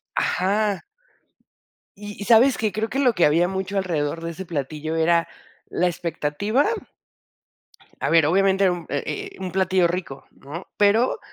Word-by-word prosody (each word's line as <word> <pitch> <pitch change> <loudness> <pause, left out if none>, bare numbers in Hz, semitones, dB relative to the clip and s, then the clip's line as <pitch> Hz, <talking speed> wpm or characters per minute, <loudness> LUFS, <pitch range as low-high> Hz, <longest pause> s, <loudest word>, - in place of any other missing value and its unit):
Ajá. 200 +2 0 1.1
¿Y 205 0 -9
y - - -4
sabes 240 +4 +5
qué? 215 -2 0
Creo 215 +3 -2
que 270 - -2
lo 255 -4 +3
que 175 - +3
había 165 +4 +3
mucho 190 +1 -3
alrededor 165 -3 -1
de 165 - -3
ese 190 +3 -8
platillo 155 0 -4
era 165 +1 +2 0.4
la 180 - +1
expectativa 175 - -1 1.4
A - - 0
ver, 165 -2 +5
obviamente 195 +4 +3
era 180 - +3
un 175 -2 -7
eh 145 - -3
eh - - -18
un 185 -2 -5
platillo 185 -1 +2
rico, 170 -6 -5
¿no? 160 +6 -10
Pero 220 - +3
185 Hz, 160 wpm, -23 LUFS, 165-205 Hz, 1.4 s, sabes